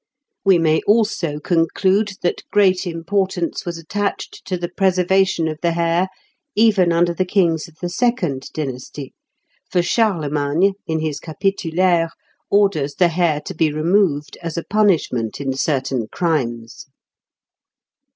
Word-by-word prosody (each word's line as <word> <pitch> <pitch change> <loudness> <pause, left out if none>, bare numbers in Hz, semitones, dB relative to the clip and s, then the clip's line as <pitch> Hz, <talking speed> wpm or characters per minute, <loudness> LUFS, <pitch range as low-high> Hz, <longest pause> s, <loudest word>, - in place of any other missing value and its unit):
We 195 -3 +5
may 160 -1 +2
also 205 -8 +1
conclude 190 +6 +1
that 175 - 0
great 190 -3 +3
importance 175 +1 -2
was 170 -1 -3
attached 200 +5 -4
to 185 - -2
the 175 0 -3
preservation 185 -1 +2
of 155 -1 -4
the 170 -1 +1
hair 170 +2 +1 0.5
even 205 -5 +4
under 170 +1 +2
the 180 - 0
kings 175 -4 +1
of 165 - -19
the 175 - -3
second 175 - -1
dynasty, 135 -1 -6 0.6
for 175 - +1
Charlemagne, 170 -3 +1
in 160 -1 -1
his 155 -2 -2
Capitulaires, 170 0 0 0.4
orders 190 -9 +2
the 180 -2 +3
hair 165 -3 +1
to 190 - -7
be 160 -2 +1
removed 155 -1 +1
as 165 -2 -5
a 170 - -2
punishment 175 - +1
in 135 -2 -2
certain 135 -4 -1
crimes. 120 -9 -2
170 Hz, 130 wpm, -20 LUFS, 155-190 Hz, 0.6 s, We